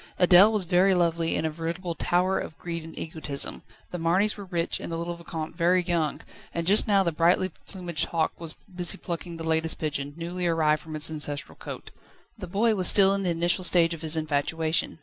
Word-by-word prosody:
Adèle 185 Hz, +3 st, +7 dB
was 210 Hz, -4 st, 0 dB
very 185 Hz, +2 st, +3 dB
lovely 170 Hz, -1 st, +1 dB
and -, -, -1 dB
a 160 Hz, -, -1 dB
veritable 170 Hz, +2 st, -4 dB
tower 180 Hz, +3 st, +1 dB
of 155 Hz, -, -7 dB
greed 170 Hz, -1 st, -5 dB
and 160 Hz, -, -11 dB
egotism. 155 Hz, -3 st, -2 dB, 0.3 s
The 180 Hz, -, -5 dB
Marnys 185 Hz, +6 st, +2 dB
were 200 Hz, -, -9 dB
rich 170 Hz, -3 st, -1 dB
and -, -, -7 dB
the 165 Hz, -, -3 dB
little 170 Hz, +1 st, -3 dB
Vicomte 165 Hz, -2 st, -7 dB
very 180 Hz, +1 st, +2 dB
young, 165 Hz, -4 st, -1 dB, 0.3 s
and 170 Hz, 0 st, -2 dB
just 205 Hz, +6 st, +5 dB
now 200 Hz, -2 st, +4 dB
the 170 Hz, -, 0 dB
brightly 175 Hz, +3 st, +2 dB, 0.2 s
plumaged 175 Hz, -4 st, 0 dB
hawk 160 Hz, -2 st, -1 dB
was 165 Hz, -2 st, -4 dB, 0.2 s
busy 175 Hz, -2 st, -1 dB
plucking 170 Hz, -1 st, -6 dB
the 165 Hz, -, -7 dB
latest 160 Hz, 0 st, +1 dB
pigeon, 145 Hz, -2 st, -4 dB
newly 175 Hz, +1 st, -3 dB
arrived 155 Hz, -2 st, +2 dB
from 160 Hz, -1 st, -8 dB
its 155 Hz, +1 st, -1 dB
ancestral 145 Hz, -2 st, -4 dB
cote. -, -, -9 dB, 0.4 s
The 205 Hz, -5 st, -8 dB
boy 220 Hz, +6 st, +2 dB
was 185 Hz, -4 st, +1 dB
still 195 Hz, -1 st, +6 dB
in 200 Hz, -, -1 dB
the 185 Hz, -, -1 dB
initial 175 Hz, +2 st, 0 dB
stage 170 Hz, -1 st, +3 dB
of 165 Hz, -, -8 dB
his 160 Hz, 0 st, -1 dB
infatuation. 155 Hz, +2 st, 0 dB
170 Hz, 210 wpm, -26 LUFS, 160-180 Hz, 0.4 s, Adèle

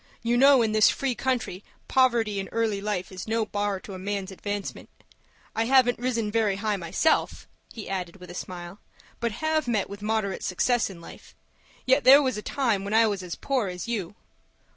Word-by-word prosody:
You 235 Hz, +1 st, +1 dB
know 270 Hz, 0 st, +6 dB
in 220 Hz, -, 0 dB
this 215 Hz, -1 st, +5 dB
free 270 Hz, -2 st, -1 dB
country 240 Hz, -7 st, -2 dB, 0.2 s
poverty 235 Hz, -6 st, +2 dB
in 195 Hz, -, -4 dB
early 220 Hz, -2 st, -1 dB
life 200 Hz, -3 st, -3 dB
is 185 Hz, +2 st, -7 dB
no 225 Hz, 0 st, 0 dB
bar 205 Hz, -2 st, -2 dB
to 200 Hz, -, -9 dB
a 185 Hz, -, -7 dB
man's 200 Hz, 0 st, -3 dB
advancement. 205 Hz, +1 st, -5 dB, 0.7 s
I 225 Hz, -, +1 dB
haven't 250 Hz, -1 st, +4 dB
risen 235 Hz, -4 st, -1 dB
very 215 Hz, -3 st, +1 dB
high 210 Hz, +1 st, -1 dB
myself," 190 Hz, -, 0 dB, 0.2 s
he 220 Hz, -, -8 dB
added, 180 Hz, -2 st, -4 dB
with 180 Hz, -2 st, -11 dB
a -, -, -8 dB
smile, 180 Hz, +1 st, -7 dB, 0.4 s
"but 235 Hz, -2 st, -1 dB
have 315 Hz, +3 st, -1 dB
met 215 Hz, -5 st, 0 dB
with 200 Hz, +1 st, -8 dB
moderate 210 Hz, -2 st, -1 dB
success 240 Hz, +6 st, +1 dB
in 175 Hz, -3 st, -11 dB
life; -, -, -13 dB, 0.5 s
yet 260 Hz, +2 st, +3 dB
there 265 Hz, +3 st, +9 dB
was 260 Hz, -1 st, 0 dB
a 210 Hz, -, -4 dB
time 230 Hz, -6 st, 0 dB
when 200 Hz, +2 st, -2 dB
I 225 Hz, 0 st, +6 dB
was 205 Hz, -3 st, -1 dB
as 180 Hz, -2 st, -6 dB
poor 260 Hz, -7 st, -1 dB
as 180 Hz, +2 st, -6 dB
you." 205 Hz, -5 st, -3 dB
215 Hz, 195 wpm, -26 LUFS, 195-240 Hz, 0.7 s, there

